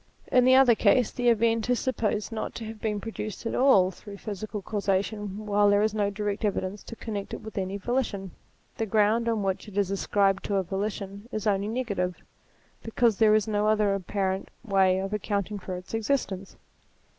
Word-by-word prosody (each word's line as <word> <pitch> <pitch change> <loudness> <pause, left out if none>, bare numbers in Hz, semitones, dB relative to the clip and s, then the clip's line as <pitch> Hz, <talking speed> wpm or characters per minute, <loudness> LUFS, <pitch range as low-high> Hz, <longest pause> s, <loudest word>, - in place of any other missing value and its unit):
In 250 -1 +5
the 260 0 +6
other 265 -2 +7
case, 240 +1 +3
the 245 -1 +1
event 230 0 +2
is 245 - +2
supposed 220 -5 -1
not 225 - -4
to 230 - -6
have 220 0 -8
been 210 -2 -1
produced 215 +1 -6
at 230 - -2
all 200 -9 +5
through 200 +2 -11
physical 210 0 -6
causation, 205 +1 -2
while 205 0 +3
there 205 +1 +4
is 215 -1 +1
no 205 -2 +1
direct 205 +1 -3
evidence 200 -1 -1
to 230 - -8
con 225 -1 -6
nect 200 -1 -4
it - - -9
with 220 -1 -9
any 195 0 -2
volition. 200 -4 -2 0.5
The 225 - -1
ground 220 +3 +2
on 220 -3 0
which 195 +2 -2
it 205 -1 -9
is 200 -2 +1
ascribed 195 0 +1
to 200 - -1
a 195 - +2
volition 200 +2 -4
is 215 -2 -3
only 200 -1 +1
negative, 205 -7 -2 0.6
because 225 -1 +1
there 215 -1 +6
is 215 -1 +2
no 210 -1 +1
other 210 -2 +3
apparent 190 0 -2
way 190 -4 +3
of 195 +2 -3
accounting 205 0 -2
for 185 -1 -5
its 180 +4 -11
existence. 220 -5 -2
210 Hz, 195 wpm, -27 LUFS, 195-225 Hz, 0.6 s, other